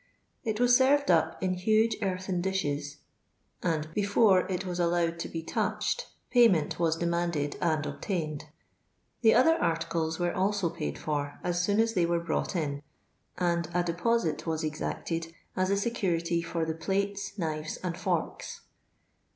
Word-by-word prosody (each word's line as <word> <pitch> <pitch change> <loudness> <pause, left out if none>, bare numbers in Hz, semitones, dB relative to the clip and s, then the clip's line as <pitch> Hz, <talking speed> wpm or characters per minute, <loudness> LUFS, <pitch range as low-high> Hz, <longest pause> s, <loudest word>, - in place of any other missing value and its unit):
It 220 -3 -2
was 245 0 +5
served 275 -1 +4
up 160 0 +2
in 185 -1 +1
huge 215 +4 +2
earthen 185 -2 -1
dishes, 145 -6 -2 0.6
and 160 -3 0
before 200 -1 +4
it 185 +1 -2
was 180 -1 -3
allowed 170 -1 +1
to - - -4
be 165 -1 -5
touched - - -1 0.2
payment 210 - +4
was 165 -2 +2
demanded 170 -3 -1
and 155 -3 +1
obtained 155 -7 -3 0.4
,* - - -45
the 225 -2 +6
other 325 +6 +6
articles 165 - -1
were 175 0 0
also 195 -2 +1
paid 165 -3 -4
for 145 -2 -3
ns 175 0 0
soon 205 +4 +1
as 225 0 +3
they 175 -4 +2
were 170 0 +1
brought 170 +3 -2
in; 145 -4 -2 0.6
and 170 -2 0
a 175 - +3
deposit 175 0 0
was 160 0 -1
exacted 165 +2 -3 0.2
as 185 0 +1
a 200 - +2
security 175 -6 0
for 165 0 -2
the 160 - -2
plates, 200 +5 -2
knives, 155 -3 -3
and 175 -2 -2
forks. - - -3
175 Hz, 155 wpm, -29 LUFS, 160-200 Hz, 0.6 s, the